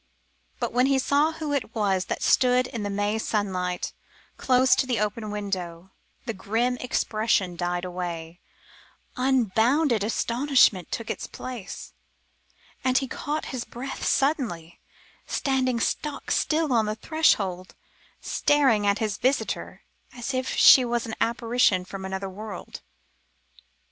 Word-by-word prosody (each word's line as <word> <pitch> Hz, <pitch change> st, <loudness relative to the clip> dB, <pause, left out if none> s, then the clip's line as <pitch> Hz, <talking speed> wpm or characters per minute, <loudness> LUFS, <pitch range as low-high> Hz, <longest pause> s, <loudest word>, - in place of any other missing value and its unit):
But -, -, -2 dB
when 250 Hz, +2 st, +3 dB
he 275 Hz, -1 st, +3 dB
saw 285 Hz, +4 st, +2 dB
who 310 Hz, -2 st, -4 dB
it 255 Hz, -5 st, -3 dB
was 195 Hz, -4 st, +1 dB
that -, -, -3 dB
stood 250 Hz, -1 st, +4 dB
in 235 Hz, -3 st, -5 dB
the 205 Hz, -, -3 dB
May 205 Hz, +2 st, -1 dB
sunlight, 185 Hz, -5 st, -2 dB, 0.4 s
close 255 Hz, 0 st, +3 dB
to 260 Hz, -, +1 dB
the 245 Hz, -4 st, 0 dB
open 210 Hz, +1 st, -2 dB
window, 190 Hz, -4 st, -5 dB, 0.3 s
the 230 Hz, -, -3 dB
grim 225 Hz, +6 st, 0 dB
expression 215 Hz, -7 st, 0 dB
died 175 Hz, +1 st, -2 dB
away, 175 Hz, -2 st, -5 dB, 0.8 s
unbounded 250 Hz, 0 st, +2 dB
astonishment 235 Hz, -3 st, +2 dB
took 230 Hz, -, -3 dB
its -, -, -5 dB
place, 245 Hz, -7 st, -8 dB, 0.9 s
and 255 Hz, 0 st, +2 dB
he 270 Hz, -, 0 dB
caught 300 Hz, +4 st, -3 dB
his 250 Hz, -2 st, -3 dB
breath 255 Hz, +4 st, -7 dB
suddenly, 235 Hz, -, 0 dB, 0.5 s
standing 260 Hz, -3 st, 0 dB
stock 290 Hz, +4 st, -2 dB
still 310 Hz, -3 st, +1 dB
on 225 Hz, -3 st, +2 dB
the 215 Hz, -, -2 dB
threshold, 195 Hz, -, 0 dB, 0.4 s
and -, -, -22 dB
staring 265 Hz, -8 st, +2 dB
at 200 Hz, 0 st, +3 dB
his 215 Hz, -2 st, -2 dB
visitor, 265 Hz, +2 st, -1 dB, 0.3 s
as 245 Hz, +2 st, -5 dB
if 255 Hz, 0 st, -1 dB
she 260 Hz, -, +8 dB
was 240 Hz, -1 st, -1 dB
an 225 Hz, -, -6 dB
apparition 230 Hz, -5 st, +2 dB
from 190 Hz, +1 st, -7 dB
another 190 Hz, +1 st, -4 dB
world. 205 Hz, +2 st, -8 dB
230 Hz, 135 wpm, -25 LUFS, 195-260 Hz, 0.9 s, she